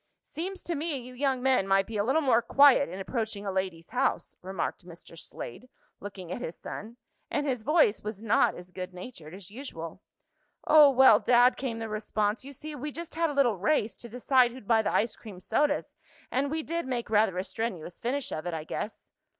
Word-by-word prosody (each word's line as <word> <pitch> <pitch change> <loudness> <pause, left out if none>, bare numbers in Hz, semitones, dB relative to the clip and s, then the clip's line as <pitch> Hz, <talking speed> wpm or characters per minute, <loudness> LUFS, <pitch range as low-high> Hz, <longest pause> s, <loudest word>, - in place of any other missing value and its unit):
"Seems 370 +3 -6
to 345 - -2
me 310 -1 -2
you 250 0 -9
young 260 -1 0
men 260 -7 +3
might 195 0 +3
be 225 - -8
a 205 - +1
little 275 +8 +2
more 245 -4 +4
quiet 280 +3 +5
in 185 - -7
approaching 215 0 -3
a 195 - -1
lady's 185 -3 -3
house," 255 +3 0
remarked 190 +1 -4
Mr. 170 -1 -13
Slade, 165 - -9 0.3
looking 190 -3 -8
at 240 - -4
his 160 - -5
son; 225 +3 -8 0.3
and 290 - -1
his 255 -5 -1
voice 295 -5 +3
was 210 0 -6
not 225 -1 +3
as 180 +1 -11
good 180 0 -7
natured 180 -5 -9
as 195 -1 -12
usual. 185 - -8 0.6
"Oh, 300 -2 +8
well, 265 0 +7
Dad," 245 +1 +5
came 250 -4 -4
the 225 0 -4
response, 215 +1 -1
"you 275 - -9
see 305 +3 -7
we 295 +1 -5
just 335 +3 -7
had 330 0 +1
a - - -3
little 245 -8 +2
race, 215 +1 +1
to 235 - -10
decide 250 +1 +3
who'd 255 -5 -12
buy 225 -2 +4
the 210 - -1
ice 225 +1 +1
cream 205 -5 -11
sodas, 290 +9 0 0.4
and 275 +2 0
we 315 +2 -2
did 335 -1 -3
make 240 -4 -3
rather 210 -3 +3
a 185 - 0
strenuous 195 -7 -5
finish 270 +3 -2
of 155 +3 -4
it, 175 - -2
I 155 - -4
guess." 210 +6 -6
235 Hz, 210 wpm, -28 LUFS, 195-275 Hz, 0.6 s, Oh